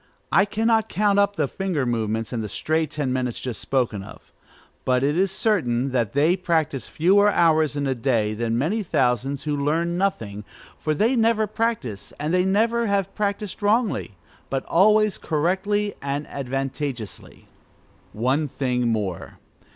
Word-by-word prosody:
I 195 - +5
cannot 220 +1 +1
count 205 0 +2
up 200 0 +2
the 150 -4 0
finger 180 -5 -2
movements 115 -2 -2
and 115 -2 -2
the 105 - -5
stray 155 +8 0
ten 145 -3 -2
minutes 125 -2 -2
just 125 -4 -5
spoken 120 -7 0
of; 95 - -13 0.5
but 125 0 +1
it 145 +2 +2
is 190 +2 +2
certain 140 - 0
that 120 -5 0
they 155 +6 +3
practise 160 -7 -1
fewer 200 +5 +4
hours 160 -5 +3
in 145 - -1
the 135 -1 +1
day 115 -4 0
than 115 +1 -1
many 175 - 0
thousands 135 - 0
who 150 -1 -1
learn 165 +5 0
nothing, 110 - -2 0.3
for 155 -1 -2
they 225 - +2
never 225 -2 +3
practise 215 - -3
and 150 +3 -2 0.2
never 230 +3 +2
have 195 -1 0
practised 205 0 -3
wrongly, 210 - +1 0.3
but 135 -1 -2
always 215 +3 +3
correctly 190 +6 0
and 140 +1 -3
advantageously. 135 -3 -5 0.6
One 130 +7 0
thing 125 -3 -1
more. 105 -6 -3
150 Hz, 150 wpm, -23 LUFS, 125-200 Hz, 0.6 s, I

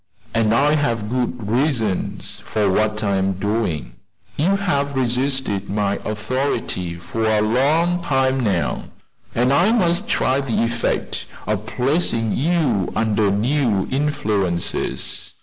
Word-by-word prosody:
And 115 -2 +2
I 145 +6 +4
have 115 -8 0
good 125 -3 -2
reasons 115 - -1
for 105 -2 0
what 105 +2 +1
I 100 -2 +1
am 95 0 +1
doing. 100 -4 -2 0.4
You 180 +7 +2
have 140 -8 0
resisted 125 -5 0
my 100 0 0
authority 110 -6 -2
for 85 +6 -3
a 110 -1 +3
long 155 +11 +2
time 135 -4 +1
now, 100 -8 0 0.5
and 125 +3 +3
I 175 +9 +4
must 175 -7 +2
try 130 +2 +2
the 120 -4 0
effect 115 0 -1 0.2
of 105 0 -2
placing 125 -4 0
you 140 - +1
under 110 -2 +2
new 110 -1 +1
influences. 110 -11 -1
115 Hz, 125 wpm, -21 LUFS, 105-140 Hz, 0.5 s, I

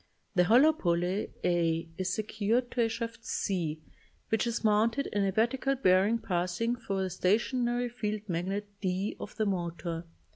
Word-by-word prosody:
The 180 -2 +4
hollow 260 - +6
pulley 180 - 0
a 165 -1 +1
is 185 +1 -2
secured 220 +4 0
to 245 - 0
a 225 - +3
shaft 230 0 -5
c 160 -5 -2 0.5
which 225 +2 +1
is 235 0 -2
mounted 225 +5 +3
in 205 -1 +2
a 195 - +1
vertical 255 +6 +1
bearing 195 -1 +4
passing 185 +3 -1
thru 195 -5 -2
the 190 - -2
stationary 240 +6 +1
field 215 -3 -4
magnet 190 +4 -2 0.2
d 190 +1 -1
of 210 - -8
the 215 - 0
motor. 170 -3 -3
205 Hz, 155 wpm, -30 LUFS, 180-230 Hz, 0.5 s, hollow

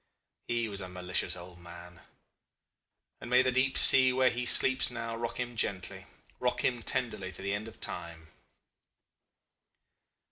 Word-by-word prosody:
He 120 -1 -2
was 100 -2 -4
a 90 - -7
malicious 90 0 -3
old 90 0 -13
man 85 0 -13 1.2
and - - -10
may 125 +1 +4
the 130 - 0
deep 130 +1 0
sea 130 -1 +7
where 130 0 +2
he 125 +1 -4
sleeps 130 +1 +4
now 115 -2 -6
rock 115 +1 -6
him 120 -1 -5
gently, 95 -4 -4 0.3
rock - - -2
him 120 -2 -1
tenderly 105 -6 -2
to - - -2
the 100 +1 -2
end 105 +2 -5
of 115 - -14
time! 85 -2 -6
115 Hz, 150 wpm, -29 LUFS, 90-125 Hz, 1.2 s, sea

